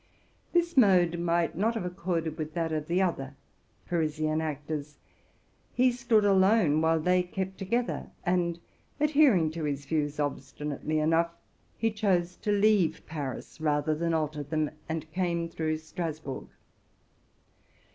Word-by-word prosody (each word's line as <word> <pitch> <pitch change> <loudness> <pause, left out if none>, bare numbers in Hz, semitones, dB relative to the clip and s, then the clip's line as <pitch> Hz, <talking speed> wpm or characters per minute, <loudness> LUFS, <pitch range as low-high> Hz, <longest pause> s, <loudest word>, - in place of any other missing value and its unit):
This 345 0 +1
method 180 -8 +5
might 170 0 +1
not 220 +6 +1
have 220 - -2
accorded 175 -3 -2
with 155 0 -4
that 165 -2 -1
of 155 -1 -2
the 180 +3 +2
other 135 -7 -2 0.5
Parisian 155 -2 0
actors. 150 -1 -4 0.8
He 255 0 +4
stood 235 -3 +2
alone, 190 -5 +4
while 160 0 +3
they 180 +3 +3
kept 190 +1 -4
together; 235 +6 -1 0.2
and, 175 -1 +1 0.4
adhering 285 - +4
to 165 0 -5
his 145 -1 -2
views 150 -1 -1
obstinately 145 +1 -3
enough, 165 +2 +2 0.5
he 225 -1 +1
chose 185 -5 +1
to 210 - -2
leave 200 -5 +3
Paris 150 0 -6
rather 150 0 +1
than 165 +2 -1
alter 155 -1 -1
them, 155 +1 -1 0.2
and 160 -1 -4
came 170 -1 -1
through 160 -1 -2
Strasburg. 155 -3 -5
165 Hz, 135 wpm, -29 LUFS, 155-190 Hz, 0.8 s, method